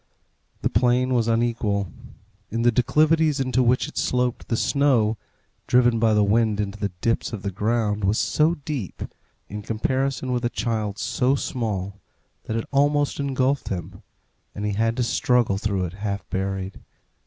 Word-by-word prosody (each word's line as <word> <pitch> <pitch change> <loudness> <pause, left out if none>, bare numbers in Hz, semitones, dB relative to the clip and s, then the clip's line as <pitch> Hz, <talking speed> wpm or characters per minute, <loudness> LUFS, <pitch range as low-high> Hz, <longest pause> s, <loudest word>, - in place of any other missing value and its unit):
The - - +2
plain 125 +3 +2
was 120 -2 +2
unequal. 115 -5 0 0.6
In 115 +2 -2
the 120 - +5
declivities 155 +5 +3
into 130 -1 +1
which 125 +1 +2
it - - -5
sloped 125 -1 0
the 115 - 0
snow, 125 -7 +2 0.5
driven 120 -2 +4
by 110 -1 +3
the 105 - +4
wind 110 0 +2
into 105 0 -3
the 100 - -1
dips 115 0 0
of 105 -3 -5
the 100 - -2
ground, 105 +1 0
was 100 +3 +2
so 155 +3 +2
deep, 140 - -5 0.4
in 105 +1 -6
comparison 130 +4 -1
with 125 0 -1
a 120 - +1
child 110 -4 -2
so 125 +4 +1
small, 100 -7 -3 0.4
that 110 - -2
it 115 - -2
almost 145 +1 +2
engulfed 135 0 0
him, 95 0 -5 0.5
and 105 - -4
he 105 - 0
had 115 +3 0
to 125 - +1
struggle 120 -3 +2
through 100 -3 -1
it 85 - -6
half 100 0 -4
buried. 95 0 -3
115 Hz, 165 wpm, -24 LUFS, 105-125 Hz, 0.6 s, the